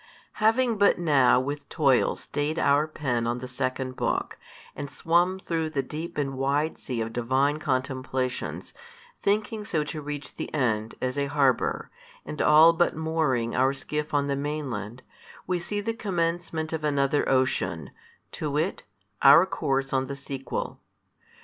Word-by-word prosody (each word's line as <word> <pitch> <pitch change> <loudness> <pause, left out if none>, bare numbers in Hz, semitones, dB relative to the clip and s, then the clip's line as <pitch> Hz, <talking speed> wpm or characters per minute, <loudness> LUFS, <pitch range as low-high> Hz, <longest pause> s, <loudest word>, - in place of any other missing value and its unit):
Having 225 0 +3
but 200 - +5
now 140 -8 +4
with 140 +2 -4
toil 135 -6 +3
stayed 150 +2 -3
our 145 -1 +3
pen 125 -7 -2
on 120 +1 -1
the 130 +1 -6
second 130 0 -3
book, - - -2 0.4
and 145 0 -5
swum 175 +6 +1
through 165 -4 -2
the 140 -3 -1
deep 160 +5 -6
and 140 -2 -1
wide 140 +4 0
sea 120 -3 -4
of 115 0 -4
Divine 135 +5 +1
contemplations, 130 -2 -2 0.5
thinking 210 +2 0
so 165 -7 -1
to 150 +1 -6
reach 145 0 -7
the - - -5
end, 110 -5 0
as 130 +2 -1
a 140 - 0
harbour, 140 -3 +1 0.3
and 150 - -4
all 160 +2 +7
but 175 +1 +1
mooring 155 -7 0
our 130 +2 +3
skiff 150 +2 -4
on 145 -1 +1
the 140 -1 -1
mainland, 130 -6 -4 0.4
we 180 -1 -1
see 205 +4 -3
the 225 +2 -2
commencement 170 -5 -2
of 160 -1 -3
another 140 -1 +1
ocean, 130 - 0 0.4
to 150 - -3
wit; 155 +6 -1 0.4
our 155 +6 +8
course 135 -7 -1
on 135 0 +1
the 140 - -5
sequel. 135 -1 -5
145 Hz, 155 wpm, -26 LUFS, 130-160 Hz, 0.5 s, our